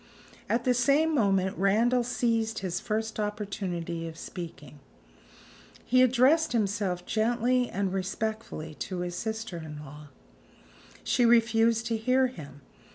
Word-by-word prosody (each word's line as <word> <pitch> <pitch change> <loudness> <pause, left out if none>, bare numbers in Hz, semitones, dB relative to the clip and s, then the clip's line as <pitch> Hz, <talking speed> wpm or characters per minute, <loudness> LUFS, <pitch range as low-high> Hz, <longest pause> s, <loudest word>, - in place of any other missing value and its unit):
At 235 +1 +1
the 250 - +3
same 280 +6 +3
moment 195 -7 +2
Randal 230 +6 +3
seized 230 -2 0
his 180 0 -2
first 220 0 -3
opportunity 195 -5 -3
of 165 0 -9
speaking. 150 -5 -9 1.1
He 255 0 +4
addressed 260 +5 +4
himself 200 -5 -1
gently 240 +2 +1
and 195 -1 -2
respectfully 195 -4 -4
to 185 -2 -4
his 175 0 -3
sister 220 -2 -4
in 155 -2 -8
law. 150 +2 -11 1.0
She 245 - +2
refused 230 -1 +4
to 230 -1 -1
hear 255 +4 +2
him. 145 - -8
220 Hz, 125 wpm, -28 LUFS, 180-240 Hz, 1.1 s, He